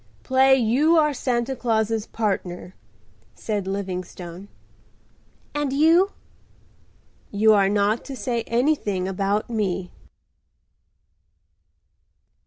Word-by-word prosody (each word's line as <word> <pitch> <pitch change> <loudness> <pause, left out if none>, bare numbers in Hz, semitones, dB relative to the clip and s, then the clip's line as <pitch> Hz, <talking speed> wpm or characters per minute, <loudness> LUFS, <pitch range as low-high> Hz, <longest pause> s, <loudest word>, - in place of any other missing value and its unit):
Play 265 +1 +4
you 265 +7 +3
are 300 -2 +3
Santa 245 0 -1
Claus's 225 -2 -1
partner," 185 -4 -3 0.6
said 205 -3 -3
Livingstone. 185 -1 -6 1.1
"And 295 -2 -1
you?" 330 +7 +4 1.2
"You 215 +2 +4
are 200 -2 +3
not 205 +2 +1
to 275 - -7
say 235 0 -2
anything 230 -7 0
about 195 +2 -1
me." 195 -5 -2
220 Hz, 85 wpm, -23 LUFS, 195-265 Hz, 1.2 s, Play